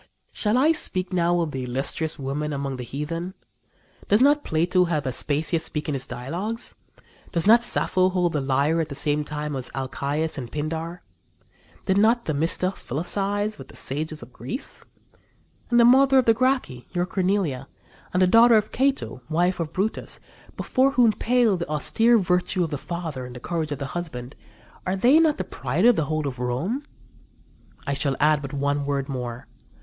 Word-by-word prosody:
Shall 215 +2 +1
I 295 +5 +5
speak 185 - -1
now 175 0 +2
of 160 -3 -2
the 130 -2 -4
illustrious 135 +5 -2
women 145 +2 -3
among 140 -1 -3
the 125 - -5
heathen? 165 - -5 0.7
Does 205 - +4
not 290 +3 +4
Plato 175 +3 +2
have 155 -4 -1
Aspasia 150 +5 0
speak 150 -1 -5
in 150 - -1
his 135 -1 -3
dialogues? 180 - -5 0.6
Does 170 - +1
not 230 +3 +6
Sappho 185 -5 +2
hold 180 -2 +1
the 150 - 0
lyre 140 +5 +1
at 160 - -4
the 140 - -6
same 145 +2 0
time 150 0 -4
as 130 -2 -5
Alcæus 140 +4 -2
and 120 -3 -7
Pindar? 160 +3 -4 0.8
Did 190 0 +2
not 230 +3 +3
Themista 165 +5 +1
philosophize 200 - -2
with 135 - -10
the - - -15
sages 150 +1 -4
of 120 +1 -14
Greece? 130 - -6 0.9
And 240 -1 +4
the 235 - +7
mother 265 +2 +6
of 260 - +4
the 225 - +6
Gracchi, 250 - 0
your 175 0 0
Cornelia, 180 -8 -1 0.4
and 180 +1 +3
the - - +6
daughter 230 +4 +6
of 215 - -1
Cato, 270 - 0
wife 175 +3 +1
of 160 -2 -3
Brutus, 195 +5 -2 0.4
before 270 +1 +2
whom 235 -4 +4
pale 235 -4 +2
the 170 -3 -5
austere 225 +10 +3
virtue 180 -1 +1
of 165 - -3
the 145 - -3
father 165 -6 -5
and 125 - -11
the - - -7
courage 160 +2 -3
of 145 - -2
the 140 - -4
husband 145 -7 -6 0.5
are 185 - -1
they 245 +11 +5
not 315 -2 +3
the - - -2
pride 150 - -2
of 245 -1 +7
the 160 - 0
whole 155 0 -2
of 125 -3 -6
Rome? 135 - -2 1.0
I 140 - -1
shall 140 -1 0
add 150 -1 +3
but 140 -1 -6
one 140 0 -1
word 140 -1 -1
more. 125 -3 -5
165 Hz, 185 wpm, -24 LUFS, 140-205 Hz, 1.0 s, the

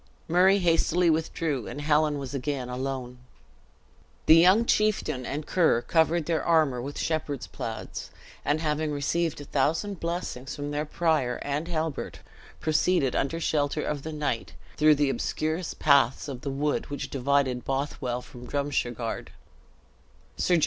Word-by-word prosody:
Murray 185 +4 +5
hastily 170 -1 +3
withdrew, 155 -5 -1
and - - -6
Helen 150 0 +2
was 135 -1 -6
again 135 -2 -3
alone. 125 -1 -4 1.1
The 160 - +8
young 185 +7 +6
chieftain 215 - +1
and 150 +2 -3
Ker 160 -10 +2
covered 165 0 +2
their 160 -3 0
armor 155 -7 +3
with 140 +3 -6
shepherd's 150 -4 -2
plaids; - - -6 0.3
and 150 +2 +1
having 155 -1 0
received 150 +3 -1
a - - -8
thousand 165 +9 0
blessings 165 -6 -4
from 145 0 -4
the 150 +1 -1
prior 155 -7 +1
and 145 +3 -2
Halbert, 160 -3 -3 0.4
proceeded 155 -3 +2
under 160 +5 0
shelter 150 -2 0
of 145 -2 -2
the 160 - -6
night, 150 -6 -2 0.2
through 155 0 +5
the 145 -1 +2
obscurest 160 +5 -2
paths 140 -2 +3
of 130 -3 -6
the 140 - -3
wood 145 +2 -1
which 145 - -5
divided 135 -2 +1
Bothwell 135 -3 -2
from 125 0 -11
Drumshargard. 125 -5 -2
150 Hz, 140 wpm, -27 LUFS, 135-160 Hz, 1.1 s, The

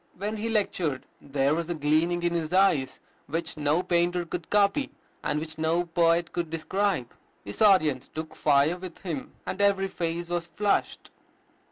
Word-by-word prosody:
When 210 +3 -3
he 225 +2 -3
lectured, 180 - -1 0.2
"there 140 0 +1
was 170 +1 -2
a 175 - -1
gleaming 160 +4 +1
in 175 0 +1
his 165 -2 -2
eyes 185 -8 +2 0.3
which 165 +3 -3
no 150 +3 +1
painter 175 0 +1
could 170 0 -6
copy, 205 +7 +2 0.3
and 150 - 0
which 160 0 -6
no 165 +2 +1
poet 170 0 +2
could 170 -2 -2
describe. 165 - -1 0.3
His 100 - -7
audience 155 - +4
took 155 0 -7
fire 145 +3 +3
with 180 -2 -9
him, 160 -8 -5
and 195 - -3
every 195 -1 +3
face 170 -1 -3
was 175 -1 -2
flushed." 205 +4 -1
170 Hz, 165 wpm, -27 LUFS, 155-185 Hz, 0.3 s, audience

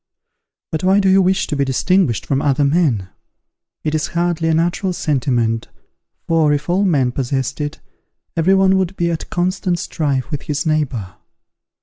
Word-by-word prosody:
But 160 +1 -3
why 190 +2 +4
do 195 - +2
you 195 +1 +5
wish 190 +1 +2
to - - -3
be 140 - +1
distinguished 140 - +1
from 135 0 0
other 145 0 +2
men? 140 - +1 0.7
It 155 - -1
is 155 -1 0
hardly 170 -1 0
a - - +3
natural 175 +3 0
sentiment, 120 -8 0 0.6
for, 160 -2 +3
if 145 0 -2
all 195 +3 +2
men 140 -9 +2
possessed 135 +2 -2
it, 145 +2 -4 0.6
every 175 +4 +3
one 190 0 +4
would 190 0 -2
be 170 -2 0
at 165 - -4
constant 180 0 -1
strife 140 -5 -2
with 145 - -3
his 150 +1 -3
neighbour. 135 - -1
155 Hz, 165 wpm, -18 LUFS, 135-180 Hz, 0.7 s, you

